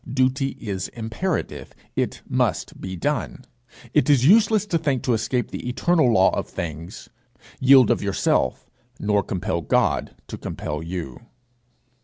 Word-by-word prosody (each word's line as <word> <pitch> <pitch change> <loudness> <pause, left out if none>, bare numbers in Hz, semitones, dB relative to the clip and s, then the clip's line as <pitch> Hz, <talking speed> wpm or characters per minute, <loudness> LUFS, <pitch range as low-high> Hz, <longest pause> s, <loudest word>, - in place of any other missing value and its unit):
Duty 130 +1 0
is 95 -5 -4
imperative; 120 +11 -4 0.2
it - - -2
must - - -1
be 95 0 -5
done. 85 - -3 0.5
It - - +3
is 135 -3 +4
useless 215 +3 +5
to 175 -5 0
think 140 -6 -1
to 125 - +1
escape 120 +3 -1
the 125 - -5
eternal 155 +1 +2
law 95 -4 +5
of - - -3
things; 85 +3 -7 0.5
yield 130 -3 +6
of - - +1
yourself, 95 -9 0 0.3
nor 105 -1 +2
compel 90 -2 -3
God - - 0
to - - -8
compel 75 +1 -5
you. 80 -6 -6
120 Hz, 140 wpm, -23 LUFS, 95-140 Hz, 0.5 s, yield